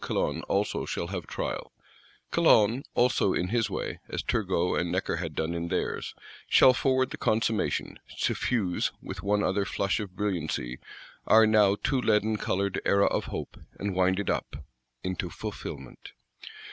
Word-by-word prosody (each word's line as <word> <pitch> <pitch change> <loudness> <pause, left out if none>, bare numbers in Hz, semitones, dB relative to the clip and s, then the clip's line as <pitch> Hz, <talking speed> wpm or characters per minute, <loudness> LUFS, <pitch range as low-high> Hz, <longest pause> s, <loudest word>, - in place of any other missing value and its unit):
Calonne - - -1
also 100 +2 0
shall 85 - -3
have 90 -4 -5
trial; - - -4 0.6
Calonne 110 +5 +4
also, 120 -5 +3
in 90 - -1
his 115 -2 +1
way, - - -4
as - - -3
Turgot 90 -5 0
and 85 -1 -1
Necker 90 -2 -1
had 80 -3 -4
done 80 +2 -1
in 85 0 -3
theirs, - - -2 0.3
shall 130 - +7
forward 130 0 +1
the - - -5
consummation; 110 -1 0 0.2
suffuse, 100 -8 0
with - - -6
one 105 +1 +1
other 95 +2 +1
flush 100 0 -1
of 100 -4 -6
brilliancy, 85 -11 -2 0.5
our 110 0 +7
now 105 -2 +4
too 130 +5 0
leaden 110 -1 +2
coloured 100 -1 -1
Era 100 0 +4
of - - 0
Hope, - - -6 0.2
and 100 -1 -2
wind 95 +1 +2
it 100 - -3
up—into 65 +9 -6
fulfilment. 70 -4 -8
100 Hz, 150 wpm, -28 LUFS, 90-110 Hz, 0.6 s, shall